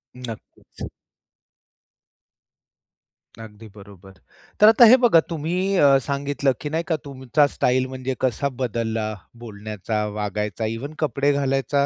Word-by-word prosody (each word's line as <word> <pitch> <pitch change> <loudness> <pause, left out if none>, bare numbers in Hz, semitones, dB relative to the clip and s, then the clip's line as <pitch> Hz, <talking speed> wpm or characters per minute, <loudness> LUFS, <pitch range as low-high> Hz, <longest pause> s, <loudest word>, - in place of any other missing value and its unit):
नक्कीच. 125 -3 -10 2.5
अगदी 110 0 -12
बरोबर. 100 -2 -15 0.5
तर 210 - +7
आता 225 +2 +7
हे 255 - +8
बघा, 240 -9 +5
तुम्ही 175 +5 -2
अ, 140 -4 +5
सांगितलं, 140 0 -1
की 150 - -4
नाही 160 +2 -2
का, 165 - +1
तुमचा 140 +1 +1
स्टाइल 130 +1 +1
म्हणजे 130 0 -5
कसा 130 +2 0
बदलला, 110 -2 -2 0.3
बोलण्याचा, 105 0 -4
वागायचा, 105 +1 -3
इव्हन 115 +7 -5
कपडे 145 0 +1
घालायचा. 140 0 0
130 Hz, 115 wpm, -22 LUFS, 110-145 Hz, 2.5 s, हे